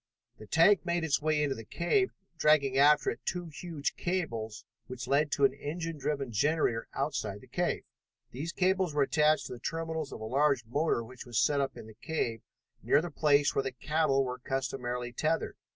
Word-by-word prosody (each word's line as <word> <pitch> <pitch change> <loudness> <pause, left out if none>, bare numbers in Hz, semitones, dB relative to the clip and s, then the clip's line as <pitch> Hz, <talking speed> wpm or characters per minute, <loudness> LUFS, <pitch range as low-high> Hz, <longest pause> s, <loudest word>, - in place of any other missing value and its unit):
The 110 - -11
tank 170 - +5
made 170 -1 0
its 155 -3 +1
way 155 0 +2
into 140 -2 0
the 115 - -8
cave, 175 - +1 0.3
dragging 150 -4 +3
after 145 0 +5
it - - -7
two 175 -2 -3
huge 155 -3 -4
cables 115 -12 -3 0.2
which 130 0 -6
led 145 +2 +2
to 140 - +4
an 135 - +3
engine 160 +3 -5
driven 140 -3 -2
generator 120 0 +1
outside - - -2
the - - -14
cave. - - -1 0.5
These 150 +7 -4
cables 185 -3 +1
were 145 - +4
attached 150 +2 +3
to - - -6
the 120 - -9
terminals 160 +1 -3
of - - -7
a - - -7
large 135 0 +2
motor 140 +1 0
which 125 +2 -11
was 120 -3 -3
set 140 +5 +3
up 135 -2 -3
in - - -9
the 110 - -12
cave 115 -2 -3 0.4
near - - +4
the 170 +1 -4
place 145 -1 +3
where - - +2
the 135 -1 -3
cattle 135 +1 +1
were 125 0 -4
customarily 125 -2 -3
tethered. 155 +6 -1
145 Hz, 195 wpm, -30 LUFS, 125-160 Hz, 0.5 s, tank